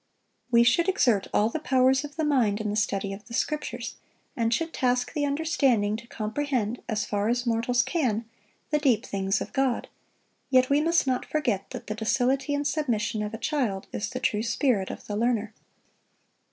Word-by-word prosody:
We 235 -1 +6
should 335 +10 +3
exert 240 - +2
all 210 +2 +3
the 315 - -3
powers 265 -1 +3
of 290 0 -8
the 320 - -1
mind 245 -9 +2
in 210 -1 -2
the - - -2
study 200 -2 -1
of 205 +1 -11
the 235 - -6
Scriptures, 300 +3 -3 0.4
and 230 -3 0
should 325 +6 -1
task 250 -1 0
the 290 -2 0
understanding 275 -8 +1
to 235 +1 -12
comprehend, 235 0 -2
as 210 -2 0
far 205 +1 -1
as 245 +1 0
mortals 240 +1 +2
can, 245 -6 0 0.5
the 300 - +3
deep 265 -7 +2
things 195 0 -1
of - - -6
God; 265 -3 0 0.6
yet 255 0 +4
we 285 +1 +4
must 335 0 +2
not 255 -1 0
forget 240 -11 -1
that - - -7
the 215 - -3
docility 260 +5 +1
and 285 0 -2
submission 235 -8 0
of 210 +1 -3
a - - -5
child 230 -6 -1
is 210 +1 -2
the 255 - -4
true 210 -4 0
spirit 235 -3 +1
of - - -8
the 205 - -4
learner. 225 -1 0
245 Hz, 190 wpm, -27 LUFS, 215-280 Hz, 0.6 s, We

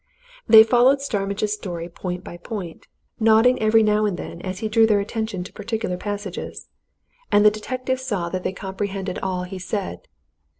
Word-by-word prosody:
They 220 -1 +10
followed 250 +4 +4
Starmidge's 205 -5 -2
story 175 -5 -5
point 180 +1 -6
by 175 - -9
point, 180 -2 -7 0.3
nodding 225 +3 +4
every 220 +1 +4
now 215 0 +2
and 190 -4 -2
then 170 - -7
as 185 0 -5
he 220 - -2
drew 225 +1 +4
their 210 -2 +3
attention 215 -2 -3
to - - -11
particular 220 -3 -3
passages, 205 0 -6 0.6
and 205 0 +5
the 210 - +8
detective 255 +4 -3
saw 205 -10 -2
that 185 +1 -3
they - - -1
comprehended 195 0 -4
all 185 -1 -2
he 185 +1 -7
said. 200 - -4
205 Hz, 170 wpm, -22 LUFS, 185-220 Hz, 0.6 s, They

